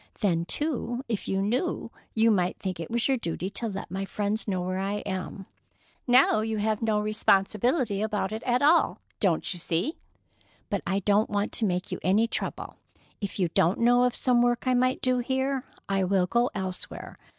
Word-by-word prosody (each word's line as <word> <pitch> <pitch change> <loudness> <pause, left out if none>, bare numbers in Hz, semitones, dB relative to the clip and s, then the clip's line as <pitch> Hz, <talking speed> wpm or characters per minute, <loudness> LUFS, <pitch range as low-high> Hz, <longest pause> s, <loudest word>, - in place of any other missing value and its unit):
Then, 170 -5 +1
too, 255 - -1
if 225 -3 -3
you 195 0 0
knew, 250 - -1 0.2
you 225 0 +4
might 180 -3 +1
think 185 -3 -4
it 165 - -5
was 235 0 +1
your 270 -1 +2
duty 185 -2 -4
to 230 - -3
let 195 -4 -6
my 190 +1 -2
friends 205 +2 -2
know 190 -3 0
where 185 +1 -2
I 200 +2 -2
am. 190 0 -4 0.6
Now 250 -3 +5
you 220 0 -2
have 215 0 0
no 220 -2 +1
responsibility 210 - +1
about 210 -2 -1
it 220 +1 -4
at 250 +2 +1
all, 320 +4 +4 0.2
don't 185 -4 +1
you 175 - -7
see? 170 - -1 0.7
But - - 0
I 195 +1 0
don't 205 +3 +2
want 205 0 -1
to 225 - 0
make 180 -2 -2
you - - -3
any 200 +5 +3
trouble. - - -5 0.4
If 200 - -4
you 180 -4 +1
don't 165 +2 +2
know 245 +1 +4
of 250 - 0
some 245 -2 +2
work 240 +1 +1
I 255 - +3
might 255 +1 +1
do 255 -1 +2
here, 265 +2 -1 0.2
I 195 -1 +1
will 185 0 +2
go 235 +6 +1
elsewhere. 190 -2 -5
210 Hz, 195 wpm, -27 LUFS, 190-245 Hz, 0.7 s, Now